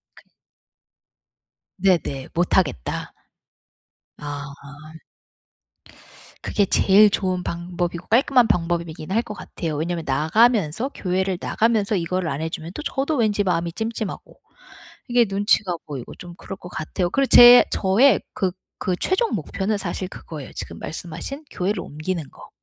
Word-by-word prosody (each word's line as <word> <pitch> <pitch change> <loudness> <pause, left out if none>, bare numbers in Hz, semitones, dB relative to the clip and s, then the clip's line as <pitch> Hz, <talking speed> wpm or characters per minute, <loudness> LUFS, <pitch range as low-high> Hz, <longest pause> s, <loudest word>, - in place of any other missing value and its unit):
근 - - -20 1.5
네네. 175 -8 0
못하겠다. 170 - 0 1.0
아. 145 -1 -6 2.0
그게 205 - +1
제일 205 +2 +5
좋은 185 -2 -1
방법이고 175 0 -4
깔끔한 250 +1 +4
방법이 170 -3 0
이긴 160 +2 -8
할 225 +4 +2
것 210 - -6
같아요. 165 -6 -5
왜냐하면 165 +2 -2
나가면서, 195 - +2
교회를 185 0 -1
나가면서 220 -2 +1
이거를 180 0 -1
안 140 +1 -3
해주면 160 +1 -5
또 300 - -5
저도 280 +3 -1
왠지 215 -5 +1
마음이 170 -3 0
찜찜하고 220 -1 -5 0.7
이게 240 -1 +4
눈치가 195 -1 +1
보이고 135 -5 -7
좀 175 -1 -11
그럴 195 - -8
것 180 - -11
같아요. 175 +2 -3
그리고 275 +7 +1
제 245 0 +9
저의 215 +8 +4
그 190 -3 -1 0.3
그 185 - 0
최종 380 - 0
목표는 205 +2 -2
사실 185 -1 -4
그거예요. 155 -6 -9
지금 - - -7
말씀하신 175 - -6
교회를 185 +1 -2
옮기는 155 0 -5
거. - - -14
185 Hz, 295 characters per minute, -22 LUFS, 165-215 Hz, 2.0 s, 제